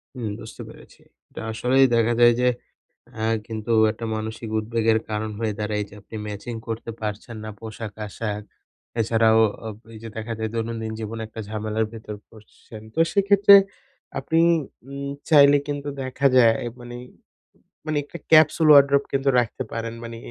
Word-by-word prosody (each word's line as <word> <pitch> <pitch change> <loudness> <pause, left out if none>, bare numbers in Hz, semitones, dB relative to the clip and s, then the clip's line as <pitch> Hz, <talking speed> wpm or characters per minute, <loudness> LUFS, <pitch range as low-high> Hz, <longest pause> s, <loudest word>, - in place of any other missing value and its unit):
হুম 115 -4 -4
বুঝতে 110 - -10
পেরেছি। - - -16 0.3
এটা - - -8
আসলেই 130 +4 +3
দেখা 115 0 +3
যায় 120 0 +7
যে, 125 - +3 0.7
আ - - -1 0.2
কিন্তু 110 0 -4 0.2
একটা 115 +1 -7
মানসিক 110 +1 -5
উদ্বেগের 110 0 +1
কারণ 110 0 -2
হয়ে 110 -2 -1
দাঁড়ায়। 105 0 -1
যে - - -16
আপনি 105 - -12
ম্যাচিং 105 +3 -6
করতে 115 +1 -4
পারছেন 110 +2 -5
না 110 - -6
পোশাক 110 -1 -7
আশাক। 105 0 -4 0.6
এছাড়াও 110 0 +3
ও - - +3 0.2
ও - - -3 0.2
ওই 115 - -11
যে 115 - -6
দেখা 115 +1 -4
যায় 110 0 -2
দৈনন্দিন 115 -1 -3
জীবনে 110 +1 -5
একটা 110 - -10
ঝামেলার 110 +1 -2
ভেতর 110 -1 -8
পড়ছেন। 110 0 -14
তো - - -2
সেক্ষেত্রে 200 0 +6 0.6
আপনি 160 +4 0 0.5
উম 140 0 -5 0.2
চাইলে 145 -2 +7
কিন্তু 145 0 -3
দেখা 130 +2 +1
যায় 115 -3 +6 0.2
মানি 120 0 -9 0.9
মানি 155 -1 -1
একটা 160 +4 -10
ক্যাপসুল 155 0 +6
ওয়ারড্রোব 140 -1 +6
কিন্তু 135 0 +1
রাখতে 120 +2 -2
পারেন। 115 0 -4
মানি 115 0 -7
115 Hz, 160 wpm, -23 LUFS, 110-135 Hz, 0.9 s, যায়